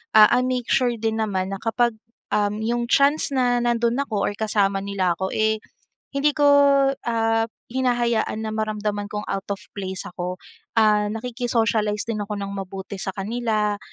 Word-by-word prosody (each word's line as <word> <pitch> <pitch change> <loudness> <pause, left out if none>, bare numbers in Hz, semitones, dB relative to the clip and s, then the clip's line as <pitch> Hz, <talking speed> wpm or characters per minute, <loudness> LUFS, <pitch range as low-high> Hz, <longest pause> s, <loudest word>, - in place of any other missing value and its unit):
Ah, 215 -1 +10
I 250 - +3
make 255 -2 -1
sure 255 -2 +3
din 225 0 -1
naman 190 -2 -2
na 195 - -5
kapag, 235 +1 +1 0.4
uhm, 210 0 +1
yung 240 +1 0
chance 285 +3 +3
na 245 -1 +2
nando'n 240 +1 +1
ako 215 -7 -2
or - - 0
kasama 205 -2 +1
nila 195 -2 0
ako, 190 +2 -2
eh, 220 0 +2 0.5
hindi 280 +1 +2
ko, 295 - +1 0.6
ah, 225 -1 +1 0.2
hinahayaan 240 -4 0
na 220 - -3
maramdaman 210 -1 -2
kong 210 0 -3
out 195 0 -3
of - - -19 0.2
place 190 -2 -4
ako. 180 0 -4 0.4
Ah, 210 -1 +4
nakiki-socialize 225 -2 0
din 225 -2 -2
ako 210 +1 -5
ng 200 0 -4
mabuti 195 0 -6
sa 190 0 -4
kanila 210 0 -1
220 Hz, 165 wpm, -23 LUFS, 205-235 Hz, 0.6 s, Ah